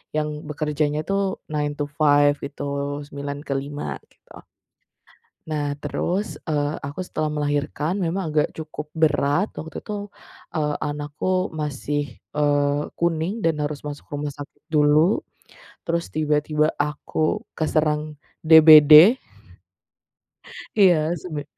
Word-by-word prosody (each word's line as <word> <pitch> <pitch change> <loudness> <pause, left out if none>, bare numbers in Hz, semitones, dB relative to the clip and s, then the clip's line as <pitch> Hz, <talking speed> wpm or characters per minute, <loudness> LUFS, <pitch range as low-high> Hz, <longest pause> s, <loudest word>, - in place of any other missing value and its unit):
yang 150 0 0 0.2
bekerjanya 150 0 -1
tuh 195 - +1 0.3
nine 150 -1 -1
to - - +1 0.2
five 145 -1 +5
gitu 140 0 -9 0.5
9 140 0 -6
ke 140 - -1
5, 145 +1 -5 0.2
gitu. - - -17 1.0
Nah, 145 -2 -3
terus, 190 +7 -2
eee, 145 -1 0
aku 140 +5 -6
setelah 155 -3 -2
melahirkan 145 +2 -1
memang 170 -1 -2
agak 150 - +3
cukup 155 -1 -7
berat. 150 +3 +2
Waktu 160 +1 -7
itu, 205 -1 -6 0.4
eee, 150 -2 -1
anakku 150 +6 -2
masih, 145 -1 -3 0.2
eee, 145 -1 +1 0.2
kuning 170 +5 0
dan 160 -2 +1
harus 150 0 -4
masuk 145 0 -7
rumah 145 0 -4
sakit 145 0 -11
dulu, 155 +3 +3 0.6
terus 170 0 -2
tiba-tiba 150 0 +1
aku 150 +1 -1
keserang 155 -1 0 0.2
DBD. 160 - +8 1.6
Iya, 175 -5 +4
sebe 150 -3 -6
150 Hz, 115 wpm, -23 LUFS, 145-160 Hz, 1.6 s, DBD